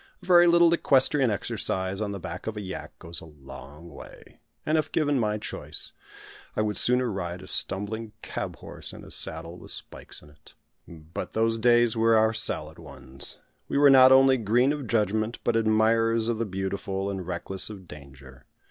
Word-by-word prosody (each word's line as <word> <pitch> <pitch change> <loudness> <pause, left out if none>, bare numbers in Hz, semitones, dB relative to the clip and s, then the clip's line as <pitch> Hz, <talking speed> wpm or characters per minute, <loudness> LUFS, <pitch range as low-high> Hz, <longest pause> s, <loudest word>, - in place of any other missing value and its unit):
A - - -12
very 175 -1 +6
little 170 0 +5
equestrian 135 -4 +3
exercise 95 -1 -3
on 105 -1 -2
the 100 - -6
back 90 +2 -7
of 110 -1 -4
a - - -4
yak 95 -2 -8
goes 85 +1 -6
a - - -11
long 75 +1 -12
way; 70 - -14 0.3
and 155 - +1
if 155 - 0
given 145 -3 +1
my 105 -2 0
choice, 105 - -7 0.6
I - - 0
would 105 -1 -2
sooner 125 +5 +3
ride 90 -2 -5
a - - -11
stumbling 105 +4 -1
cab - - -5
horse - - -4
in - - -11
a - - -12
saddle 85 +2 -1
with - - -11
spikes - - -6
in 75 - -17
it. 75 - -21 0.3
But 80 0 -8
those 115 0 +1
days 120 0 +3
were 115 0 +3
our 110 +1 +3
salad 110 - -4
ones; 65 +1 -8 0.3
we - - -2
were 140 -1 +6
not 130 -1 +8
only 135 0 +6
"green 120 +5 +2
of 145 -4 -6
judgment," 110 +1 0
but 120 - 0
admirers 115 +1 +2
of 115 -2 -1
the 115 - 0
beautiful, 95 0 -3
and 95 -3 -6
reckless 95 +3 +1
of 95 -4 -11
danger. 70 -3 -14
110 Hz, 185 wpm, -26 LUFS, 90-120 Hz, 0.6 s, not